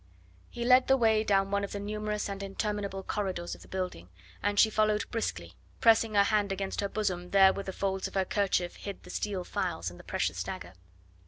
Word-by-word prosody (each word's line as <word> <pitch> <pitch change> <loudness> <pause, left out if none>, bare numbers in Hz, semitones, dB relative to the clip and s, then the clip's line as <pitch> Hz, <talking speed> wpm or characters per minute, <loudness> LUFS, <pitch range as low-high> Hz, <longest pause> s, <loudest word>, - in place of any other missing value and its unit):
He 235 - -4
led 255 +1 +6
the 265 - +5
way 220 -3 +3
down 195 -2 +2
one 200 0 +1
of 200 - -4
the 200 - -3
numerous 210 +1 -3
and 200 -1 -5
interminable 200 -1 -3
corridors 185 -5 -3
of - - -10
the - - -14
building, 180 - -4 0.3
and 205 +1 +1
she 220 - +6
followed 215 0 +2
briskly, 85 - -3 0.3
pressing 225 -1 +4
her 200 - +7
hand 205 -1 +1
against 195 +1 -2
her 200 - -1
bosom 180 -5 -2
there 195 0 +6
where - - -4
the 190 - -3
folds 190 0 -2
of - - -12
her 190 -1 +2
kerchief 185 -3 0
hid 200 -1 -7
the 180 - -10
steel 195 -2 -2
files 165 - -3
and 90 - -13
the - - -12
precious - - -1
dagger. 85 +1 -6
200 Hz, 215 wpm, -30 LUFS, 190-210 Hz, 0.3 s, her